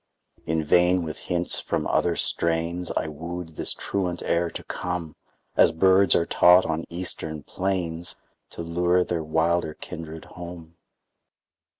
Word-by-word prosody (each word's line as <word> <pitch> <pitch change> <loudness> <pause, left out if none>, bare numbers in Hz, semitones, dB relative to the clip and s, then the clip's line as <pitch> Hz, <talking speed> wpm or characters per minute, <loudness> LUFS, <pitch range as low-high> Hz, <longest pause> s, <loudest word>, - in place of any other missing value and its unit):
In 80 0 0
vain 90 +3 +4
with 80 -1 -6
hints 90 0 +3
from - - -2
other 85 -1 +1
strains 85 +1 0
I - - 0
wooed 80 +3 -6
this 80 - -4
truant 90 -3 -2
air 85 0 +1
to - - -7
come 90 -3 -4 0.4
As - - +6
birds 95 +2 +5
are 85 - +2
taught 90 +2 +6
on 80 +1 -2
eastern 80 -3 -3
plains 90 -3 -2 0.4
To 85 - -6
lure 90 +2 +2
their 85 -2 -2
wilder 80 0 0
kindred 80 -2 -8
home. 85 -2 -10
85 Hz, 135 wpm, -25 LUFS, 80-90 Hz, 0.4 s, As